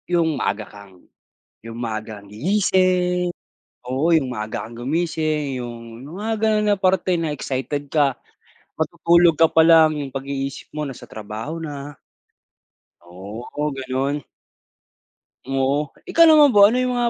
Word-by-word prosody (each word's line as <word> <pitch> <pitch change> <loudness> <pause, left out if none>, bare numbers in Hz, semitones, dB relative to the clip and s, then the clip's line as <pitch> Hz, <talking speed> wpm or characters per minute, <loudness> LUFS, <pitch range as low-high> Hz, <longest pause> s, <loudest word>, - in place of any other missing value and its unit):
Yung 170 -2 +2
maaga 105 +2 -2
kang 100 -3 -16 0.6
yung 115 0 -8
maaga 110 -2 -5
kang 100 - -17
gigising, 180 - +1 0.5
oo, 130 +6 0
yung 135 -6 +2
maaga 105 -2 -5
kang 115 +1 -11
gumising, 155 -2 -1
yung 115 -1 -9 0.2
mga 220 +2 -2
gano'n 215 -1 +2
na - - +1
parte 185 -1 +1
na 160 - -1
excited 145 +1 -3
ka. 140 -3 +1 0.6
Matutulog 170 +1 +3
ka 165 - +6
palang, 160 -1 +5
yung 145 -2 -4
pag-iisip 135 0 -5
mo 150 - -4
nasa 135 -4 -7
trabaho 110 +10 -7
na. 145 -2 -7 1.1
Oo, 105 +11 -6
gano'n. 135 +2 -2 1.3
Oo. 135 +2 0 0.2
Ikaw 335 - +5
naman 300 -4 +6
ba? 200 0 +8
Ano 240 - 0
yung 255 0 0
mga 240 -1 +1
145 Hz, 135 wpm, -21 LUFS, 125-175 Hz, 1.3 s, ba